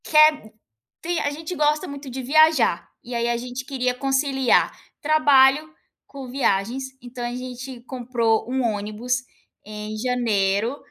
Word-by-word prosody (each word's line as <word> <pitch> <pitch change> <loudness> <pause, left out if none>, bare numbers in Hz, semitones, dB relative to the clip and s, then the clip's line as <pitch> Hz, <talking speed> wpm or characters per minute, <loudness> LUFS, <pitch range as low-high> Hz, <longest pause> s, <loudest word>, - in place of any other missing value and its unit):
Quer 305 -7 +4 0.5
sim, 345 0 -1
a 285 - 0
gente 315 +4 -6
gosta 300 +3 +1
muito 280 -1 -8
de 260 +1 -5
viajar, 295 - +3
e 245 - -8
aí 235 0 0
a 240 - +1
gente 250 +2 -6
queria 255 -2 -1
conciliar 270 0 +2 0.3
trabalho 295 0 +4 0.3
com 275 -2 -9
viagens, 245 0 0 0.2
então 245 0 -7
a 240 0 -3
gente 250 0 -7
comprou 235 -3 0
um 260 0 0
ônibus, 225 +3 -2 0.4
em 210 +1 -7
janeiro, 225 -1 0
255 Hz, 140 wpm, -23 LUFS, 235-280 Hz, 0.5 s, Quer